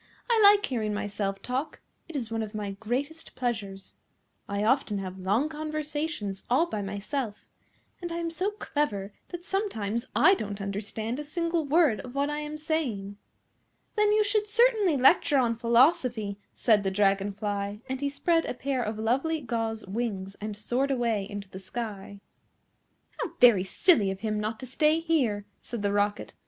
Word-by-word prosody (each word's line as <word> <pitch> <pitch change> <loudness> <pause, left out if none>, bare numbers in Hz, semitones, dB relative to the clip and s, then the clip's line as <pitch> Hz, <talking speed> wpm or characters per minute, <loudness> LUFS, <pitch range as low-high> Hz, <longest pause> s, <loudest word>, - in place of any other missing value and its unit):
I 455 -2 +4
like 410 0 +7
hearing 215 -5 -2
myself 200 -1 -3
talk. 260 +5 -3 0.3
It 330 - -8
is 235 -5 -3
one 225 0 -1
of 215 0 -5
my 205 -2 -3
greatest 255 +10 -4
pleasures. 205 -6 -3 0.6
I 200 +1 -1
often 230 -2 +2
have 190 -1 -5
long 205 +10 +1
conversations 305 -8 -4
all 260 +8 +4
by 215 -12 -4
myself, 205 +4 -4 0.6
and 345 -1 -4
I 335 - -3
am 335 -1 -2
so 365 +4 0
clever 285 - -2 0.2
that 350 0 -7
sometimes 235 - -2
I 375 - +7
don't 205 - -3
understand 215 +5 -3
a - - -3
single 335 +1 -1
word 295 -5 +3
of 250 +1 -9
what 285 +1 +1
I 295 - -2
am 300 0 -5
saying." 255 -11 -2 0.8
"Then 420 -1 +4
you 425 0 +4
should 420 0 +1
certainly 430 - +4
lecture 280 +2 +5
on 240 -3 +2
Philosophy," 235 -3 +2 0.2
said 215 -4 +4
the 195 - 0
Dragon 195 0 +2
fly, 205 0 -3
and 265 0 -3
he 285 - +1
spread 330 +3 +1
a - - -3
pair 265 0 -1
of 215 -2 -3
lovely 270 +9 +1
gauze 225 -4 -3
wings 195 -2 -3
and 210 -1 -4
soared 245 +6 0
away 230 -6 0
into 205 -1 -6
the 190 0 -9
sky. 200 -1 -6 1.0
"How 340 - -3
very 235 -7 +7
silly 210 - +3
of 190 0 -5
him 215 -1 -1
not 215 +1 -3
to - - -5
stay 300 +5 +2
here!" 265 -12 +1 0.2
said 235 -4 -6
the 200 0 +1
Rocket. 205 0 0
235 Hz, 170 wpm, -28 LUFS, 205-305 Hz, 1.0 s, like